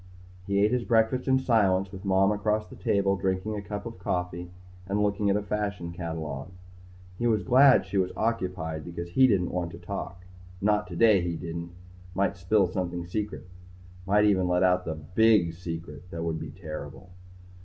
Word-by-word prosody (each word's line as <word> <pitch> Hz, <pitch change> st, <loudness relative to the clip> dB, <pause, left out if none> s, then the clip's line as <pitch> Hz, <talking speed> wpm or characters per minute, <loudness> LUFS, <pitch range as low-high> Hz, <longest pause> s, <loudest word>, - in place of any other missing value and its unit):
He 100 Hz, 0 st, 0 dB
ate 105 Hz, +2 st, +4 dB
his 125 Hz, -1 st, +1 dB
breakfast 115 Hz, +3 st, +2 dB
in 130 Hz, 0 st, +4 dB
silence 100 Hz, -7 st, +2 dB
with 95 Hz, 0 st, -9 dB
Mom 95 Hz, +1 st, +3 dB
across 105 Hz, +1 st, 0 dB
the -, -, -12 dB
table 100 Hz, -1 st, +1 dB
drinking 95 Hz, +2 st, -1 dB
a 105 Hz, -, -4 dB
cup 100 Hz, +1 st, -6 dB
of 115 Hz, -5 st, -8 dB
coffee 90 Hz, -1 st, -3 dB, 0.4 s
and 100 Hz, +2 st, +1 dB
looking 100 Hz, 0 st, +1 dB
at 100 Hz, -, +3 dB
a 105 Hz, -, 0 dB
fashion 100 Hz, -4 st, -3 dB
catalogue. 80 Hz, -4 st, -5 dB, 0.7 s
He 120 Hz, -, +1 dB
was 110 Hz, -3 st, +2 dB
glad 130 Hz, +1 st, +6 dB
she 100 Hz, -, -3 dB
was 90 Hz, -1 st, 0 dB
occupied 90 Hz, -8 st, -2 dB
because 85 Hz, +1 st, -6 dB
he 130 Hz, +8 st, +6 dB
didn't 95 Hz, -7 st, +1 dB
want 90 Hz, -1 st, -2 dB
to -, -, -8 dB
talk; 90 Hz, -1 st, -6 dB, 0.3 s
not 105 Hz, +1 st, +1 dB
today 95 Hz, +3 st, +4 dB
he 85 Hz, -1 st, -2 dB
didn't. 85 Hz, +1 st, -6 dB, 0.4 s
Might 100 Hz, +1 st, +1 dB
spill 95 Hz, +3 st, +2 dB
something 90 Hz, -1 st, -3 dB
secret. 105 Hz, +1 st, -4 dB, 0.6 s
Might 105 Hz, +2 st, +4 dB
even 95 Hz, -3 st, +3 dB
let 90 Hz, +1 st, +2 dB
out 90 Hz, 0 st, +3 dB
the 80 Hz, -, -3 dB
big 90 Hz, +3 st, +3 dB
secret. 80 Hz, -1 st, -7 dB
That 85 Hz, -1 st, -5 dB
would 80 Hz, -1 st, -2 dB
be -, -, -6 dB
terrible. 80 Hz, +1 st, -8 dB
95 Hz, 180 wpm, -27 LUFS, 85-105 Hz, 0.7 s, glad